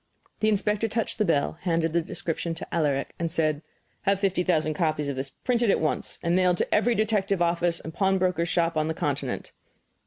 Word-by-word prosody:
The 215 - +3
inspector 210 +1 +1
touched 225 +1 -2
the 215 - +3
bell, 160 -1 +1
handed 165 -2 0
the 170 - +3
description 165 0 -4
to - - -9
Alaric, 145 -5 0
and 170 -1 -1
said: 155 -2 0 0.4
"Have 200 -1 +1
fifty 195 -2 +1
thousand 160 -4 +1
copies 155 -2 0
of 140 - -2
this 135 +1 -4
printed 240 - 0
at - - +3
once 155 - -2
and 170 0 +2
mailed 180 -1 +3
to - - -1
every 230 +3 +3
detective 205 -3 +1
office 170 0 +1
and 160 - -8
pawnbroker's 185 -2 +1
shop 170 -1 +1
on 155 0 +1
the 160 - -2
continent." 140 -4 -3
170 Hz, 195 wpm, -26 LUFS, 160-195 Hz, 0.4 s, The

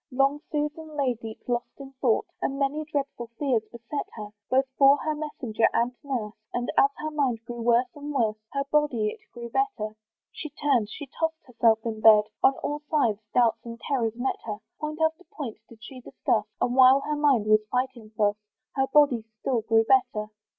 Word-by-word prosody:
Long 275 +2 +1
Susan 300 +1 -3
lay 270 -3 +2
deep 225 -1 -10
lost 240 -1 -1
in 270 -1 -9
thought, 240 -5 +2 0.2
And 275 - -1
many 285 +2 -1
dreadful 275 -4 -3
fears 265 -6 +1
beset 235 +5 -5
her, 210 -2 -7 0.2
Both 265 +1 +3
for 275 0 +6
her 310 +1 -2
messenger 260 -7 0
and 240 +2 +1
nurse; 240 -7 -3 0.2
And 245 0 -1
as 275 - +6
her 310 0 -4
mind 255 -6 -1
grew 240 0 -6
worse 235 +2 +4
and 290 0 -6
worse, 225 -6 +1
Her 275 0 -1
body 275 -8 +2
it - - -9
grew 235 -1 -8
better. 225 - -1 0.4
She 310 - -7
turned, 270 -7 +1
she 290 - -7
toss'd 320 +4 -3
herself 225 -3 +2
in 220 -2 -3
bed, 215 -1 +8 0.2
On 270 - +6
all 295 0 -2
sides 235 -9 +2 0.2
doubts 235 -2 +3
and 230 0 -8
terrors 230 -5 -1
met 250 +2 -2
her; 210 -2 -4 0.2
Point 305 0 -4
after 320 +3 -2
point 275 -11 -7
did 225 -1 -16
she 255 +2 -10
discuss; 215 -3 -1
And 245 - 0
while 260 +1 +7
her 300 +1 -2
mind 280 -7 +3
was 215 0 +5
fighting 250 -3 -2
thus, 205 -1 +2 0.4
Her 270 -1 +2
body 270 -5 +4 0.2
still 245 -4 0
grew 225 +1 +3
better. 245 -5 +2
255 Hz, 190 wpm, -26 LUFS, 225-285 Hz, 0.4 s, bed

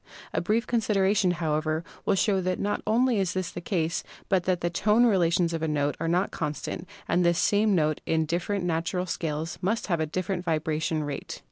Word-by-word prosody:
A - - +1
brief 215 +6 +1
consideration, 205 -4 +2
however, 155 -2 0 0.2
will 200 - +4
show 195 +1 +2
that 185 0 -1
not 205 +1 -1
only 235 +1 +3
is 185 -2 0
this 185 -2 -2
the 175 - -6
case, 170 -3 -1 0.3
but 190 -4 +2
that 180 -2 +1
the 175 - +1
tone 210 +6 +3
relations 175 -5 +3
of 165 - -2
a 160 - 0
note 145 -1 0
are 165 - -1
not 180 +4 +1
constant 150 +3 -4 0.2
and 180 +1 +2
that 170 - +5
the - - +3
same 205 +3 +3
note 155 -2 +1
in 160 -1 +2
different 175 +4 -1
natural 175 +2 -1
scales 160 -2 -3
must 215 +5 0
have 170 -4 0
a 160 - 0
different 180 +3 -2
vibration 155 -1 -1
rate. 145 -1 -5
175 Hz, 205 wpm, -27 LUFS, 160-195 Hz, 0.3 s, that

